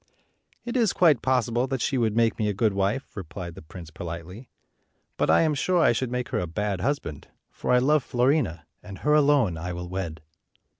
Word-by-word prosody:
"It 240 - -4
is 230 -6 +2
quite 155 -8 +4
possible 125 -1 +1
that 135 -1 -2
she 135 - -1
would 115 -4 +1
make 115 -1 +2
me 105 -1 +1
a 100 - -2
good 105 +1 +1
wife," 100 +7 -2
replied 90 -2 -7
the 95 - -11
prince, 80 +1 -11
politely; 85 +8 -8 0.7
"but - - 0
I - - +5
am 155 -2 +2
sure 180 +5 +1
I 165 - +5
should 120 +2 -1
make 125 -1 -3
her - - -1
a 90 - -2
bad 100 +2 -2
husband, 115 - -3 0.2
for - - -6
I 125 - +6
love 140 +3 +3
Fiorina, 120 - 0 0.2
and 100 -2 -10
her 150 - +4
alone 140 - +3
I 90 +2 -4
will 90 0 -6
wed." 85 -4 -5
110 Hz, 205 wpm, -25 LUFS, 90-135 Hz, 0.7 s, I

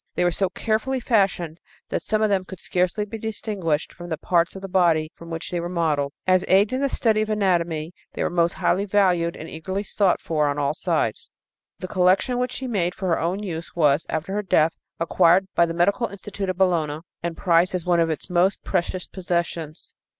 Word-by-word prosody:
They - - +1
were 175 - +3
so 190 +2 0
carefully 225 +7 -1
fashioned 190 -8 +1 0.3
that - - -1
some 215 0 0
of 215 - +3
them 190 -2 +2
could 190 -1 -10
scarcely 185 +5 0
be 220 +2 -7
distinguished 200 -8 -2
from 175 0 -9
the 160 - -2
parts 170 +2 +1
of 190 - -8
the - - -4
body 170 -4 +2
from 170 - -12
which 165 0 -5
they 175 - -1
were 170 +1 -4
modeled. 155 -5 0
As 185 0 +4
aids 200 +5 +4
in 260 - 0
the 280 - +1
study 220 -5 +2
of 215 - -2
anatomy 175 -6 0 0.2
they - - -2
were - - -1
most 170 -1 +2
highly 195 +3 +1
valued 180 -4 +2
and 160 - -8
eagerly 190 +6 -4
sought 200 -2 +1
for 155 -2 0
on 145 0 -1
all 140 -1 +1
sides. - - -1 0.5
The 185 - -6
collection 190 +7 +2
which 250 0 -1
she 265 - -4
made 185 -8 -1
for 190 -1 -3
her 165 - +2
own 180 +5 -1
use 170 -4 -6
was, 150 -2 +3
after 160 +5 -3
her 210 - 0
death, 165 -5 +2 0.2
acquired 175 +2 +4
by 170 - +4
the 165 - -3
Medical 200 +7 +2
Institute 200 0 -6
of 185 - -2
Bologna 160 -5 +1 0.2
and 170 -1 -4
prized 175 0 +3
as 180 - -3
one 175 -1 +3
of 165 -1 +2
its 155 - -4
most 180 +2 +1
precious 185 0 -1
possessions. 170 -3 -4
180 Hz, 215 wpm, -23 LUFS, 165-200 Hz, 0.5 s, As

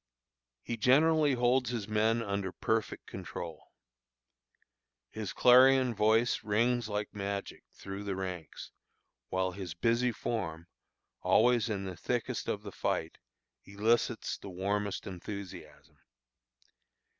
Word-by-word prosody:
He 115 - -4
generally 150 +5 +4
holds 125 0 +2
his 115 -5 -3
men 110 +2 +2
under 100 -2 -2
perfect 110 +3 -2
control. - - -8 1.4
His 105 -5 -5
clarion 130 +4 +6
voice 110 +3 +2
rings 115 +2 +1
like 105 0 -3
magic 100 0 -5
through 100 +1 -8
the 100 -1 -2
ranks, 90 -4 -6 0.6
while 95 0 0
his 90 -3 -7
busy 120 +6 +2
form, 85 -8 -4 0.6
always 120 0 +3
in 100 -2 -2
the 95 -1 -5
thickest - - -2
of - - -2
the - - -7
fight, - - -2 0.4
elicits 110 +3 0
the 100 - -9
warmest 100 +2 -2
enthusiasm. 100 +1 -9
105 Hz, 110 wpm, -31 LUFS, 100-120 Hz, 1.4 s, clarion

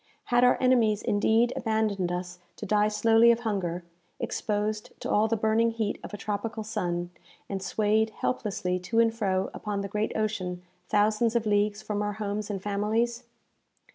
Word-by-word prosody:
Had 240 0 +5
our 250 - +5
enemies 235 -5 +3
indeed 225 +4 +2
abandoned 215 -5 0
us 180 0 -5 0.2
to - - -7
die 210 +1 +3
slowly 225 +2 +5
of 235 0 0
hunger, 185 -6 -2 0.4
exposed 210 0 -2
to - - -4
all 210 +1 +3
the 225 0 0
burning 220 +2 +2
heat 225 -2 -2
of - - -8
a 205 - -6
tropical 215 +2 -3
sun, 175 -5 -3 0.4
and 195 -1 -4
swayed 215 +3 +1
helplessly 200 -5 -2
to 205 +6 -1
and 230 -1 +4
fro 195 -4 -1
upon 205 -2 -3
the 200 - -3
great 210 +2 -1
ocean, 185 -5 -2 0.3
thousands 215 +3 +2
of 230 -2 +1
leagues 205 0 +1
from 210 -1 -2
our 205 0 -1
homes 210 0 -3
and 195 -2 -4
families? 225 +4 -1
210 Hz, 170 wpm, -27 LUFS, 200-225 Hz, 0.4 s, Had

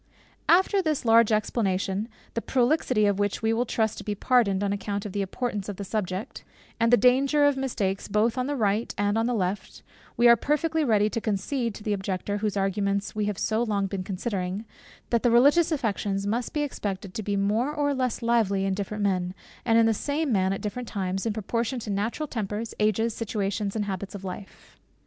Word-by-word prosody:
After 380 +3 +5
this 310 -7 -1
large 230 -1 +5
explanation, 205 -1 0 0.2
the 230 - -2
prolixity 255 -3 +2
of 200 -1 +1
which 205 +1 -1
will 225 +1 +1
we 245 - +2
trust 220 -2 -1
be 210 - -3
pardoned 205 -4 +2
on 200 0 0
account 200 0 -3
of 205 - -4
the 200 - -2
importance 205 0 -3
of 205 - -4
the 200 - -6
subject, 200 +2 -4 0.4
and 230 0 +3
the 245 - +7
danger 275 +4 +4
of 285 -1 +4
mistakes 210 -8 -2
both 215 +3 +1
on 255 0 -1
the 290 - -1
right 215 -1 0
hand 205 0 +1
and 205 - +1
on 225 - +1
the 245 - 0
left, 195 -1 -3 0.3
we 240 - +6
are 235 - +9
perfectly 310 +5 0
ready 215 -5 +3
to 230 - -2
concede 225 +3 -1
to 210 - -10
the 210 - 0
objector, 195 +1 -2
whose 205 -1 -2
arguments 200 +1 0
we 215 -1 -1
have 205 -2 -2
so 220 +1 0
long 205 -4 0
been 195 -1 -3
considering, 195 +1 -3 0.5
that 235 -1 +3
the 245 - +3
religious 285 +9 +5
affections 205 -8 -1
must 230 +3 -1
be 300 - -1
expected 200 -8 -4
to 220 - -3
be 205 -1 -2
more 210 +7 +1
or 290 -1 0
less 255 -3 -1
lively 215 -5 +2
in 195 - 0
different 205 +1 -3
men, 185 -2 0 0.3
and 225 -1 +4
in 230 - +6
the 225 - +3
same 285 +6 -1
man 190 -3 +2
at 195 - -3
different 235 +3 -4
times, 195 0 -2
in - - +1
proportion 230 +4 -2
to 220 -3 -5
natural 215 +9 -1
tempers, 220 -3 -4
ages, 215 +2 +2
situations, 205 -2 -2
and 210 -2 -1
habits 195 +1 -5
of 195 - -8
life. 190 +1 -9
215 Hz, 210 wpm, -26 LUFS, 200-240 Hz, 0.5 s, are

